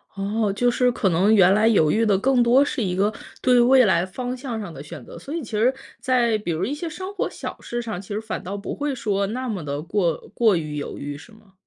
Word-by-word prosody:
哦， 205 +1 -1
就 245 +4 +2
是 250 0 +2
可 200 -4 0
能 190 +6 +3
原 190 -2 +6
来 215 +2 +3
犹 160 -9 +4
豫 225 +1 +2
的 200 -3 +3
更 255 +3 +2
多 245 +4 +5
是 255 -5 -2
一 180 -2 -1
个 205 +3 +1 0.3
对 250 -1 +4
未 255 0 +6
来 175 -2 +2
方 250 +6 -5
向 245 -4 -5
上 195 -6 -7
的 140 - -9
选 150 - -9
择， - - -11
所 285 - -8
以 330 - -3
其 225 - -10
实 230 +5 +2 0.3
在 240 -4 +2
比 175 -4 -3
如 165 +4 -1
一 275 - -2
些 330 +3 -4
生 375 +5 -7
活 395 - -2
小 - - -7
事 240 0 -4
上， 220 -6 -5
其 190 - -16
实 205 +1 -2
反 220 - -5
倒 195 +3 -5
不 200 - -5
会 290 -2 -2
说 200 -4 -1
那 255 +4 -4
么 195 -8 -3
的 145 0 -4
过 175 -3 0 0.2
过 220 -5 +3
于 155 -2 -3
犹 145 - -5
豫 145 0 -5
是 225 - -15
吗？ 215 -3 -21
215 Hz, 285 characters per minute, -23 LUFS, 190-245 Hz, 0.3 s, 原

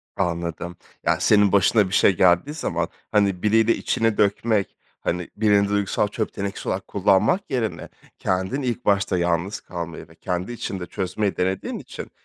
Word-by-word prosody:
Anladım. 85 0 -3 0.3
Yani, - - +2
senin 105 -2 +4
başına 100 +1 +4
bir 95 - -7
şey 95 - +4
geldiği 90 - +3
zaman, 155 - -2 0.2
hani, 100 -4 +2
biriyle 110 +2 +4
içini 115 -2 0
dökmek, 105 0 +1 0.2
hani, 90 0 -2
birini 105 -1 +3
duygusal 100 0 +1
çöp 110 +1 -3
tenekesi 100 0 -5
olarak 95 0 -3
kullanmak 100 - +2
yerine 120 -5 -2 0.3
kendin 95 +9 -1
ilk 125 -1 -3
başta 100 -2 +2
yalnız 85 +3 0
kalmayı 85 -2 -7
ve 80 - -19
kendi 90 +5 -3
içinde 95 -6 -5
çözmeyi 95 +2 -2
denediğin 95 +1 -1
için - - -9
100 Hz, 150 wpm, -23 LUFS, 90-105 Hz, 0.3 s, senin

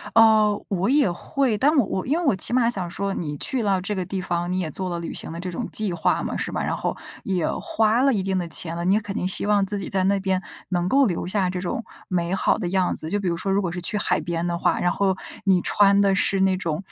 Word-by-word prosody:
哦， 215 -2 +5
我 195 +1 0
也 280 -8 +3
会， 245 +6 -1
但 295 +7 +3
我 270 -7 +4
我 190 -1 -3
因 290 +5 +2
为 350 - -2
我 275 - +3
起 190 - -2
码 245 -2 +3
想 190 -7 -4
说 195 +2 -2
你 150 -6 -4
去 255 - -1
了 195 -3 +1
这 195 +3 -3
个 185 - -1
地 185 +1 -3
方， 175 -1 -2
你 185 - 0
也 170 -4 -2
做 185 +4 -4
了 170 -1 -3
旅 170 - -5
行 - - -4
的 165 - -6
这 180 +1 -4
种 170 - -4
计 215 -3 -1
划 170 - +1
嘛， - - -3
是 - - -3
吧？ - - -2
然 - - -1
后 - - -2 0.3
也 185 -4 0
花 225 +2 +2
了 275 0 +4
一 200 -4 0
定 190 0 0
的 175 -2 -2
钱 165 0 -3
了， 170 - -3
你 185 - +4
也 - - +3
肯 205 -1 -6
定 180 - -1
希 185 - -1
望 205 -1 +3
自 205 +1 -3
己 195 - -5
在 190 -1 0
那 200 +1 +2
边 190 -1 0 0.3
能 175 -1 0
够 275 +4 +5
留 175 -5 -2
下 190 -1 +1
这 180 0 -3
种 185 +5 -3 0.2
美 175 -1 -1
好 190 - +2
的 180 -5 -3
样 185 -1 +1
子。 155 - -7
就 205 - 0
比 195 - -2
如 170 -1 0
说 195 +3 -2
如 200 +1 +2
果 180 -3 -2
是 180 +1 -5
去 210 +4 -2
海 205 - +1
边 170 0 -2
的 170 -1 -1
话， - - +1
然 175 - +2
后 190 0 +1 0.3
你 190 -3 +3
穿 200 +1 +4
的 200 -1 +4
是 195 0 +1
那 190 -1 +3
种， 170 -1 -3
190 Hz, 310 characters per minute, -23 LUFS, 175-205 Hz, 0.3 s, 哦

